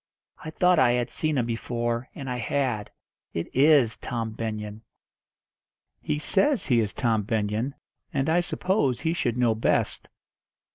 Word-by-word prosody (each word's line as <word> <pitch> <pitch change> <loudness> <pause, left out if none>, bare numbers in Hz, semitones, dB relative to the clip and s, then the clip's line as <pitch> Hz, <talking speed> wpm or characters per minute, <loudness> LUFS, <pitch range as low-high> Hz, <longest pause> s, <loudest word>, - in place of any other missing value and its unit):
"I - - -5
thought 180 +2 +3
I 120 -4 +5
had 120 -1 -1
seen 155 -2 -1
him 120 - +1
before, 120 +1 -2
and 135 - -7
I 125 -1 -2
had. 120 -3 -1 0.5
It 85 - -4
is 140 -5 +5
Tom 115 -3 -4
Benyon." 110 -1 -5 1.2
"He 150 - -1
says 200 - +2
he 120 -4 +3
is 105 -2 0
Tom 115 -3 +1
Benyon, 110 +4 -1 0.4
and 140 -3 -1
I 165 +2 +3
suppose 175 - 0
he 160 - 0
should 120 -8 -1
know 120 -2 +3
best." 110 - 0
125 Hz, 150 wpm, -26 LUFS, 115-150 Hz, 1.2 s, I